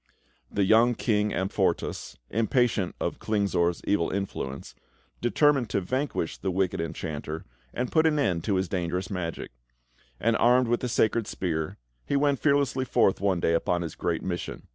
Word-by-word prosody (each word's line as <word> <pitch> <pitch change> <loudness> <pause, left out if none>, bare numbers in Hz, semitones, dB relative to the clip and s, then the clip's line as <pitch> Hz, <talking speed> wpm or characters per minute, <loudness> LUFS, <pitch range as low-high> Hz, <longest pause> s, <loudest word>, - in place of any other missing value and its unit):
The 100 - 0
young 115 +5 +5
King 105 -3 +1
Amfortas, 95 +2 -1
impatient 110 -3 +1
of - - -2
Klingsor's 95 -5 0
evil 100 -5 +1
influence, 90 -8 -4 0.5
determined 135 0 +3
to - - +1
vanquish 130 - -2
the 95 - -2
wicked 95 -2 0
Enchanter 80 -1 -5 0.3
and 125 +1 -3
put 160 0 +4
an 155 -1 +2
end 90 - +1
to 100 - +1
his 95 0 0
dangerous 90 +1 -2
magic; 85 -3 -4 0.7
and, 115 +1 +2
armed 125 +1 +4
with 120 - +2
the 125 - -3
sacred 110 -1 +1
spear, 80 -6 -3 0.3
he - - -2
went 140 -1 +2
fearlessly 140 -3 +2
forth 100 -7 +2
one 95 -3 +2
day 85 - +1
upon 85 +1 +1
his 80 - -5
great 85 -2 -2
mission. 90 -2 -4
100 Hz, 160 wpm, -27 LUFS, 85-120 Hz, 0.7 s, young